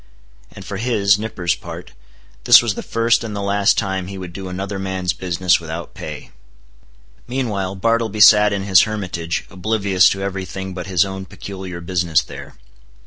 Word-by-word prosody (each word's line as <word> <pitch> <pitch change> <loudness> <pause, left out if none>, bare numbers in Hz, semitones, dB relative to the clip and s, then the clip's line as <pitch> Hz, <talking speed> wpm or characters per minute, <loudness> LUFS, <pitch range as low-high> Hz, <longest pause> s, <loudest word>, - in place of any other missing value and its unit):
And 95 - -11
for 100 - -5
his 105 -3 +2
(Nippers') 95 -6 -1
part, 85 -3 -9 0.5
this - - +9
was 115 -3 0
the - - -6
first 115 0 +1
and 110 -2 -5
the - - -3
last 100 0 +2
time 95 -1 -2
he 100 0 -7
would 90 -2 -8
do 95 +1 -7
another 95 +2 -4
man's 95 -2 -2
business 90 0 +1
without 85 0 -7
pay. - - -8 1.0
Meanwhile 105 -7 -2
Bartleby 115 +1 0
sat 105 0 +7
in 100 -1 -2
his 95 -2 +6
hermitage, 90 -6 -3
oblivious 100 -1 +2
to 95 0 -3
every 95 -1 -3
thing 95 +1 -6
but 90 0 -6
his 90 -1 +2
own 95 0 -6
peculiar 95 -1 -8
business 85 -2 +1
there. - - -11
95 Hz, 170 wpm, -19 LUFS, 90-100 Hz, 1.0 s, this